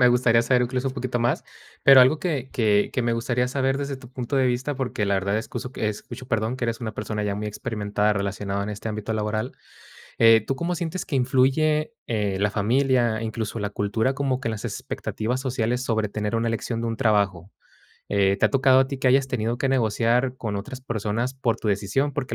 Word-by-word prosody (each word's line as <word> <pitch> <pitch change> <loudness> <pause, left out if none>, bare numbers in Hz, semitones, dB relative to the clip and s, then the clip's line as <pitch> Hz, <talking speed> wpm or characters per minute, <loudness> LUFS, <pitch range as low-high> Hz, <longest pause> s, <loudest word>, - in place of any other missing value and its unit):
Me 125 - +7
gustaría 120 -1 +4
saber, 125 +1 +3
incluso, 125 +2 -1
un 130 - -6
poquito 125 -2 -2
más. 120 +7 0 0.4
Pero 135 -1 +9
algo 130 +5 +5
que 145 -8 -2
que 105 -3 +2
que 130 - 0
me 120 0 +1
gustaría 120 +2 0
saber, 135 0 0
desde 140 -1 -3
tu 125 -2 -14
punto 130 +1 -3
de 130 -1 +3
vista. 125 +4 -1
Porque 125 -5 -2
la 100 - +2
verdad, 100 +2 0
escuso, 125 +2 -6
escucho, 110 +4 -4
perdón, 115 +1 -1
que 130 - -3
eres 115 0 -2
una 110 -2 -4
persona, 105 0 -4
ya 100 -1 -1
muy 105 +1 -4
experimentada, 105 0 -1
relacionado 100 0 -2
en 105 - -4
este 105 +2 -5
ámbito 110 +1 -3
laboral. 110 0 -2 0.7
Eh, 115 -1 +7
tú, 135 - 0
¿cómo 170 +5 -2
sientes 170 +2 -3
que 150 - -3
influye, 135 - +2
eh, 105 -4 -1
la 105 +1 +2
familia, 120 +1 +2
incluso 110 0 -3
la 105 0 -2
cultura, 105 +5 0
como 135 -2 -1
que, 130 - -3
en - - -1
las 110 -2 -6
expectativas 120 +4 -3
sociales, 125 -1 -1
sobre 110 -4 0
tener 105 +1 -2
una 115 0 0
elección 115 +1 -2
de 115 - -2
un 115 - -3
trabajo? 100 -6 +1 0.6
Eh, 100 -1 +2
¿te - - +4
ha - - +3
tocado 130 -1 +4
a 135 - +3
ti, 140 - -5
que 130 - +3
hayas 135 +1 +3
tenido 120 -2 -1
que 135 - 0
negociar 125 +1 +1
con 105 -3 -3
otras 110 +6 -6
personas, 115 +1 -2
por 130 -4 -1
tu - - -4
decisión? 105 +9 0
Porque 125 -2 -3
115 Hz, 215 wpm, -24 LUFS, 105-130 Hz, 0.7 s, Pero